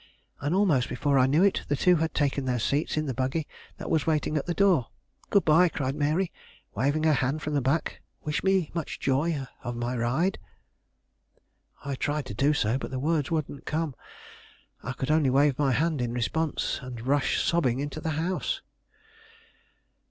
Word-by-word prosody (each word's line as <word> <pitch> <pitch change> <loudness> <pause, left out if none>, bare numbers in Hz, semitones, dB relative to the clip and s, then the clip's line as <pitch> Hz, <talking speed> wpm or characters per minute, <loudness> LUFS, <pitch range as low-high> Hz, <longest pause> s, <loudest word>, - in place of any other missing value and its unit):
And, 145 +6 -1
almost 170 -11 +2
before 140 +2 +1
I 130 - +5
knew 150 +7 +3
it, 200 - +3
the 145 - +1
two 180 +5 +4
had 160 0 -1
taken 140 -2 0
their 125 -1 0
seats 140 +7 0
in 155 - 0
the 135 - -2
buggy 130 +5 -1 0.3
that - - -7
was 160 -1 +1
waiting 155 -1 +1
at 150 - -1
the 175 - 0
door. 185 -12 +3 0.4
"Good 200 - +3
by," 165 +3 +5
cried 135 -4 -2
Mary, 155 +5 0 0.4
waving 145 +4 0
her 160 -1 +4
hand 140 +3 0
from 150 - -2
the 145 - +2
back; 140 +6 -1 0.2
"wish 150 -1 -2
me 190 -4 +2
much 165 -3 -4
joy 140 +1 0 0.2
of 120 0 -4
my 120 +1 -2
ride." 130 +11 0 1.5
I 140 - -2
tried 145 +1 -2
to 105 - -6
do 135 +8 +2
so, 130 -4 +1
but - - -5
the 130 - -4
words 150 +1 0
wouldn't 155 -4 -3
come. 155 -2 -1 0.9
I 125 - -4
could 130 +3 -2
only 155 -3 +3
wave 140 +1 +3
my 140 -2 +3
hand 150 +2 +1
in 120 -1 -2
response, 150 +6 -1
and 125 -3 -8
rush 140 +1 +2
sobbing 135 -8 +1
into 145 +2 -4
the 160 - -2
house. 180 +3 -2
145 Hz, 185 wpm, -27 LUFS, 130-160 Hz, 1.5 s, I